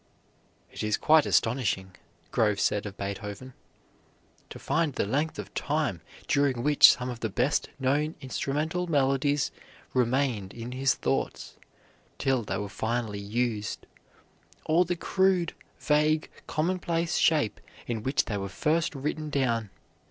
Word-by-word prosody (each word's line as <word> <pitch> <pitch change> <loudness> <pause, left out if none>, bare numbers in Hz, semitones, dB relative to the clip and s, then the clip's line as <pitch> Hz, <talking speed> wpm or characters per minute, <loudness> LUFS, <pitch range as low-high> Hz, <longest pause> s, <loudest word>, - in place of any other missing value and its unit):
"It - - -7
is 105 -1 +1
quite 155 -1 +5
astonishing," 100 -6 +1 0.4
Grove 105 -4 +2
said 105 +1 +1
of 100 - -9
Beethoven, 105 +5 -6 1.0
"to - - -8
find 160 -3 0
the - - 0
length 145 +9 -1
of - - -7
time 145 - -1 0.3
during 140 -4 +2
which 145 0 +8
some 125 0 -3
of 120 - -7
the 110 - -2
best 125 +8 0
known 145 +4 0
instrumental 155 +7 -2
melodies 140 -1 +2 0.4
remained 125 -5 0
in 120 +1 -6
his 130 +1 +1
thoughts - - -2 0.6
till 135 -2 +1
they 105 - -3
were 105 - -3
finally 110 0 -2
used, 105 0 -2 0.8
or 170 +3 +4
the 175 +1 -1
crude, 185 -1 +1 0.3
vague, 155 +1 +2 0.2
commonplace 170 0 0
shape 150 -9 +2 0.2
in 115 -2 -3
which 135 +5 +1
they 105 - -2
were 100 0 -4
first 155 - 0
written 150 +2 -3
down. 115 -7 0
130 Hz, 135 wpm, -28 LUFS, 110-155 Hz, 1.0 s, which